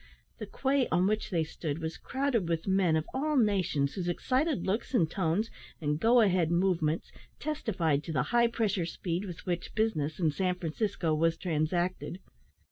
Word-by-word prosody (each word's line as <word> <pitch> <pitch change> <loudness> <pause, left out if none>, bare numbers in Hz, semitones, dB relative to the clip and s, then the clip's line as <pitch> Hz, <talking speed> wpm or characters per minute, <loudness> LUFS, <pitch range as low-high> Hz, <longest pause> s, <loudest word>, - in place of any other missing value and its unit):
The - - -5
quay 270 -1 +1
on 180 - +2
which 215 +2 0
they 170 -5 +1
stood 155 -1 -4
was 160 0 -5
crowded 260 -9 -1
with 165 -1 -1
men 190 -4 +3
of 155 0 0
all 295 +2 0
nations, 185 - +2
whose 180 -3 -3
excited 265 - 0
looks, 215 +7 -1
and 165 -8 +4
tones, 185 +6 0 0.3
and 150 -1 -1
"go 235 +5 +5
ahead" 180 -6 +3
movements, 170 -3 +1 0.3
testified 180 - -1
to 165 - -4
the 130 -5 +1
high 235 0 +5
pressure 210 -7 0
speed 175 +2 -3
with 175 -4 -8
which 175 -1 -3
business 175 -10 0
in 160 -4 +2
San 180 +3 0
Francisco 175 0 -1
was 165 +1 +2
transacted. 175 +2 -1
180 Hz, 170 wpm, -30 LUFS, 160-220 Hz, 0.3 s, go